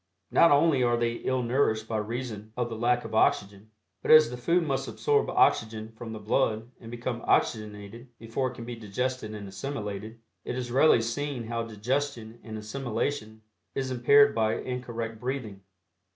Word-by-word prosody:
Not 170 - +6
only 145 -2 +4
are 120 -1 +3
they 120 0 +1
ill 130 -1 -1
nourished 115 -3 +1
by 110 - -1
reason 110 -1 -5
of 120 -1 -1
the 115 - -5
lack 120 +2 +1
of - - -7
oxygen, 100 -1 +1 0.3
but - - -5
as 155 -5 +8
the - - -4
food 170 +8 +1
must 135 -2 -1
absorb 435 -1 +1
oxygen 110 0 +2
from 115 0 -8
the 110 - -5
blood 110 +1 0
and 115 - -11
become 120 0 -4
oxygenated 105 +2 -1
before 115 +4 -2
it 125 - -11
can 115 - -8
be 120 0 -5
digested 115 +1 -3
and 100 -1 -7
assimilated, 105 0 -5 0.2
it - - -4
is 125 -1 -4
readily 130 -2 +5
seen 135 +2 -3
how 115 +1 -3
digestion 115 +1 -3
and 110 -1 -7
assimilation 110 0 -3 0.3
is 130 -1 -2
impaired 140 +3 +5
by 110 -1 +1
incorrect 120 -3 -5
breathing. 125 -6 -4
120 Hz, 170 wpm, -28 LUFS, 110-130 Hz, 0.3 s, as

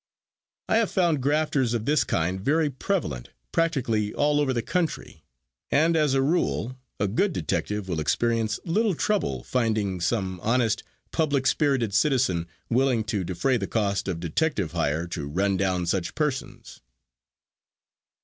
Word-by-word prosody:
I - - +3
have 225 -3 +2
found 170 -6 +1
grafters 140 -3 +1
of 110 -1 -2
this 150 +3 +3
kind 90 +3 -1
very 150 +5 +2
prevalent 130 - -2 0.2
practically 120 -11 0
all 145 0 +2
over 140 -2 +1
the 120 -3 -1
country, 175 +2 -2 0.5
and, 160 +3 +3
as 150 -4 +2
a 135 - +3
rule, 135 -5 0 0.2
a 100 - +1
good 180 - +1
detective 105 - -2
will 85 -4 -2
experience 115 +6 0
little 205 +3 +1
trouble 210 +5 -1
finding 110 -7 0
some 95 -2 -1
honest, 115 +1 +1 0.3
public 145 -4 +1
spirited 130 -6 +2
citizen 110 - +2 0.2
willing 125 -2 +2
to 105 -3 -2
defray 120 +9 0
the 100 -4 -3
cost 100 -4 -1
of 90 -3 -2
detective 90 - -1
hire 80 -1 0
to 75 -5 -4
run 95 +6 +1
down 95 -2 0
such 85 0 -1
persons. 150 -4 -3
115 Hz, 145 wpm, -26 LUFS, 95-150 Hz, 0.5 s, I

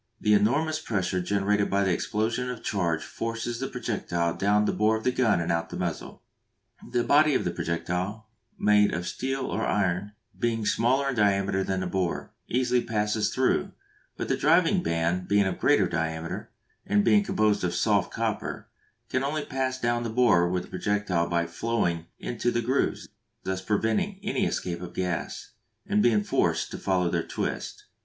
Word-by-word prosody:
The 105 - +3
enormous 145 +10 +2
pressure 95 - -1
generated 100 +2 +1
by 100 0 +2
the 95 -2 +2
explosion 110 +7 -1
of 125 - -4
the - - -18
charge 85 -5 0
forces 115 +1 -4
the 135 - -2
projectile 100 -9 -2
down 105 +1 +2
the - - +2
bore 110 +1 +2
of 110 - -8
the 125 - +2
gun 115 -7 +2
and 85 - -1
out 85 0 0
of - - -23
the - - -6
muzzle. 85 -3 -4 0.7
The 120 -1 +1
body 150 +1 +4
of - - +1
the - - 0
projectile, 90 +6 -3 0.3
made 105 -2 +4
of 90 +1 -3
steel 135 +9 -2
or - - -2
iron, 100 0 0 0.2
being 115 -2 -1
smaller 130 +6 +2
in 135 - -2
diameter 100 -2 +2
than 95 -1 -1
the - - -2
bore, 90 -2 -2
easily 125 0 +1
passes 105 -1 0
through, 130 0 +1 0.4
but - - -3
the - - +1
driving 170 +4 +3
band 85 - -1
being 100 0 +3
of 95 - -2
greater - - +4
diameter, 80 0 -3 0.3
and 105 0 +2
being 105 -2 +5
composed 105 -1 +1
of 90 -1 0
soft - - +2
copper, - - -3 0.4
can 130 - -1
only 150 +2 -2
pass 130 -1 -2
down 120 -1 0
the 115 - -3
bore 110 -7 +4
with 90 0 -1
the - - -14
projectile 100 -5 0
by 85 0 +1
flowing 85 -2 -1
into 120 0 -2
the 120 0 0
grooves, 130 +4 0 0.4
thus 95 0 -2
preventing 110 - 0
any 205 - 0
escape 85 -1 -3
of 90 - -8
gas, 90 -2 -3 0.3
and 105 - +2
being 110 -3 +3
forced 105 - 0
to - - -6
follow 90 -2 +1
their 85 0 0
twist. - - -4
105 Hz, 180 wpm, -27 LUFS, 90-120 Hz, 0.7 s, being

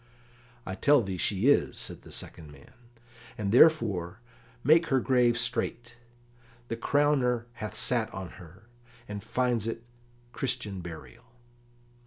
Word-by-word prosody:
"I 95 - -5
tell 140 +7 +4
thee 95 -2 -4
she 100 +4 -1
is," 145 - +3
said - - -4
the - - -15
second 75 -3 -6
man, 70 - -17 0.6
"and 100 -3 -2
therefore 110 - +4 0.4
make 160 +5 +5
her 135 - +2
grave 125 -2 +2
straight; 120 0 -2 0.8
the 115 - -2
crowner 125 -2 +1 0.2
hath 105 0 -5
sat 115 0 +1
on 95 -2 -7
her, 90 +5 -15 0.4
and 105 -1 -6
finds 125 -4 -1
it 115 0 -4 0.5
Christian 120 -7 -2
burial." 80 -8 -10
115 Hz, 130 wpm, -28 LUFS, 95-125 Hz, 0.8 s, make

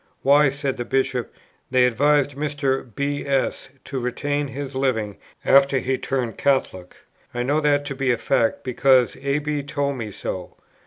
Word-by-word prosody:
'Why,' 145 +1 +5
said 140 -1 -3
the 120 - -2
Bishop, 130 -1 -1 0.4
'they 125 -1 +4
advised 145 +4 +2
Mr. 140 -3 -1
B. 145 0 -2
S. 135 -1 -1
to 135 - -4
retain 145 +4 -2
his 135 +1 -6
living 115 -7 -1 0.3
after 140 0 +5
he 130 0 -1
turned 125 -4 -3
Catholic. 110 -10 0 0.4
I 120 - -1
know 145 +4 +1
that 145 -1 +2
to 140 -1 -4
be 135 -1 +1
a 120 - +1
fact, 115 -4 0
because 130 0 +3
A. 140 +1 0
B. 150 0 -2
told 140 -1 -2
me 110 -3 -5
so.'" 95 -2 -6
135 Hz, 165 wpm, -22 LUFS, 125-145 Hz, 0.4 s, Why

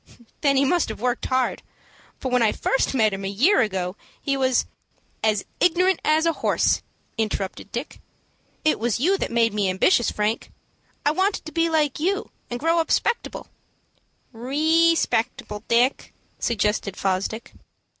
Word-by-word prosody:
"Then 280 -2 +3
he 275 - +4
must 345 0 +1
have 220 - -6
worked 245 +2 -1
hard; 255 -1 0 0.6
for 260 - -3
when 250 -1 +3
I 220 - +4
first 270 0 0
met 215 -5 +3
him 195 0 -5
a - - -2
year 270 - +3
ago, 190 -4 -2 0.2
he 275 - -1
was 260 -2 +2 0.3
" - - -40
"As 215 -2 +1
ignorant 360 +1 +3
as 310 +1 +3
a 330 - +2
horse," - - +1 0.4
interrupted 205 -2 -3
Dick. 240 +5 -6 0.6
"It 310 - +3
was 235 0 0
you 330 +9 +2
that - - -1
first - - -7
made 230 -2 +3
me 205 -2 +1
ambitious, 225 - +3
Frank. 210 +2 -2 0.5
I 295 - +4
wanted 380 +5 0
to 315 - -7
be 330 0 +1
like 300 -4 +1
you, 390 +6 -1 0.2
and 240 - -4
grow 330 +4 +2
up 325 - -1
'spectable." 470 - -1 0.9
"_Re_spectable, 275 -4 +1
Dick," 240 +3 +1 0.2
suggested 210 -3 -1
Fosdick. 195 +4 -2
255 Hz, 160 wpm, -23 LUFS, 215-315 Hz, 0.9 s, he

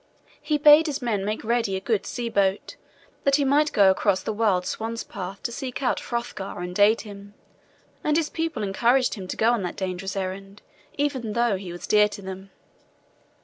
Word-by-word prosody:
He 300 0 0
bade 300 +2 +7
his 290 -2 -2
men 220 -6 -1
make 210 +2 -3
ready 230 -3 0
a - - -1
good 210 +1 -1
sea 240 -1 -4
boat, 200 -3 0 0.5
that 275 0 +4
he 285 -1 +1
might 295 +3 +3
go 195 -2 +5
across 190 0 +1
the 220 - -2
wild 205 -4 +1
swan's 225 +3 -4
path 195 -1 -7
to 235 - -2
seek 255 +2 -5
out 250 - +1
Hrothgar 235 -5 -5
and 180 +2 -5
aid 210 +3 +5
him; 200 -1 -11 0.7
and 300 0 +2
his 325 -2 +1
people 325 -10 -3
encouraged 240 +6 +2
him 190 -4 -7
to - - -5
go 225 +2 +3
on 240 -3 0
that 180 -2 -4
dangerous 190 0 -4
errand 195 +1 -5 0.3
even 265 -7 -1
though 235 -2 +2
he 190 -2 -7
was 175 - -7
dear 210 0 +4
to 205 - -9
them. 190 +1 -8
215 Hz, 195 wpm, -25 LUFS, 195-245 Hz, 0.7 s, bade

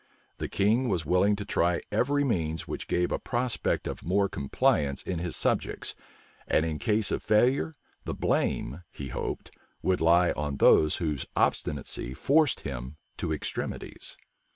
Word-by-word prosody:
The - - -3
king 115 +6 +2
was 85 -6 0
willing 90 +6 +3
to 105 0 -6
try 85 -3 +1
every 140 +7 +2
means 80 - -1
which - - -5
gave 90 0 +1
a - - 0
prospect 120 -2 -1
of - - -5
more 100 +3 +2
compliance 70 -2 +1
in 90 -3 -3
his 85 -1 -2
subjects; - - 0 0.5
and, 80 - +3
in 80 -2 -3
case 105 -1 +1
of - - -1
failure, 125 +8 +3 0.3
the - - -3
blame, 70 +8 0
he 70 -2 -7
hoped, - - -4 0.3
would 95 -1 +1
lie 85 +2 +5
on 70 -1 -3
those 75 -1 +5
whose 75 -5 -2
obstinacy 65 -3 -1
forced 150 - +3
him 65 +1 -6 0.2
to - - -2
extremities. 75 - -4
90 Hz, 155 wpm, -28 LUFS, 75-105 Hz, 0.5 s, lie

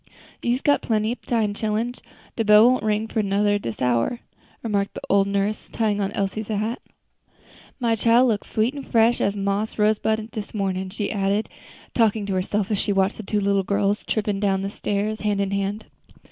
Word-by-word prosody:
"You's 245 +2 0
got 290 - +3
plenty 220 -1 0
ob 245 - -6
time, 220 -4 +1
chillens; 220 +4 -2 0.3
de 225 - 0
bell 210 +2 +7
won't 255 0 +3
go - - -3 0.3
for 220 - +2
to 205 - -3 0.2
ring 205 0 +3
dis 115 - -5
hour," 125 - +1 0.4
remarked 200 -3 -1
the - - -6
old 200 0 +4
nurse, 200 +1 -1
tying 210 -2 0
on 195 - -1
Elsie's 200 +2 -2
hat. 215 +2 -2 1.0
"My 235 -2 +2
chile 230 +3 +4
looks 220 -5 -1
sweet 225 +4 +1
an' 285 - -6
fresh 235 -2 +2
as 200 - +1
a - - -6
moss 200 +2 -1
rosebud 220 +1 +1
dis 215 -1 -6
mornin'," 190 -2 -1
she 200 +2 -3
added, 200 +1 0 0.4
talking 220 -3 +2
to 200 - -2
herself, 195 +2 -1
as 205 - +1
she - - 0
watched 195 0 +1
the - - -5
two 210 0 -1
little 200 0 +2
girls 200 +1 0
tripping 210 -2 -1
down 195 -1 0
stairs 210 +1 -2
hand 210 -1 0
in 200 -1 0
hand. 200 +2 -2
210 Hz, 195 wpm, -23 LUFS, 200-220 Hz, 1.0 s, bell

